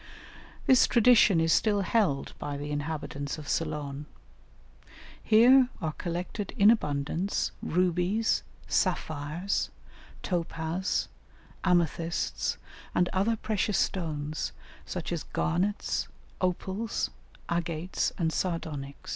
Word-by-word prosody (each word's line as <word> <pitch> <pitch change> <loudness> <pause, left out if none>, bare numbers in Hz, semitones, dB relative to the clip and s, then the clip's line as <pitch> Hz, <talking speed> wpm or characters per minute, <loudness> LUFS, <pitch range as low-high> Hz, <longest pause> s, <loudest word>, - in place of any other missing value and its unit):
This 260 -2 +6
tradition 230 -6 +6
is 165 0 +3
still 205 -2 +3
held 190 -8 +1
by 145 -1 -4
the 145 +1 -5
inhabitants 145 -1 -3
of 150 -2 -9
Ceylon. 150 -3 -2 1.1
Here 245 +4 +6
are 160 - -1
collected 180 +5 -4
in 205 0 +7
abundance, 150 -1 0
rubies, 180 +5 +1 0.3
sapphires, 155 +5 -1 0.5
topaz, 170 0 -1 0.6
amethysts, 170 -2 0 0.4
and 180 0 +3
other 200 +5 +2
precious 215 -1 0
stones, 155 -4 -2 0.3
such 180 -2 -4
as 170 -3 -1
garnets, 185 +6 -1 0.3
opals, 190 +4 -1 0.4
agates, 170 0 -1
and 165 -4 0
sardonyx. 150 -6 -3
175 Hz, 95 wpm, -29 LUFS, 155-200 Hz, 1.1 s, in